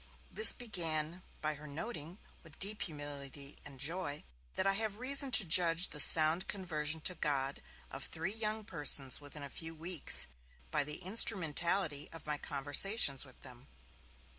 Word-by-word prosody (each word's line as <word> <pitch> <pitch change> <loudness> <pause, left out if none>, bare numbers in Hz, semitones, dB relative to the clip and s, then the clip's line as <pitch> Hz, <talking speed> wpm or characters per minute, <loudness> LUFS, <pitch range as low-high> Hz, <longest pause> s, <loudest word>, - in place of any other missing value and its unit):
This 450 - +8
began 170 -7 -3 0.2
by 155 0 -2
her 150 +1 -12
noting, 165 +1 -6 0.2
with 160 -3 -17
deep 205 +2 +2
humility 145 -2 -7
and 140 -2 -12
joy, 150 0 -4 0.3
that - - 0
'I 195 - +2
have 210 0 -3
reason 275 +3 +4
to 205 - +7
judge 170 +1 +4
the 150 - -5
sound 160 +4 +5
conversion 160 -5 -2
to 180 - +2
God 140 -5 -2 0.3
of - - -7
three 175 +5 -4
young 215 -1 -3
persons 145 -5 +1
within 145 0 -9
a - - -7
few 160 +3 -6
weeks, 170 0 0 0.5
by - - +1
the 150 +1 -4
instrumentality 175 -6 +1
of 165 - -9
my 150 -1 -4
conversations 145 - +1
with 130 - -18
them'. 125 +1 -14
160 Hz, 155 wpm, -33 LUFS, 145-190 Hz, 0.5 s, This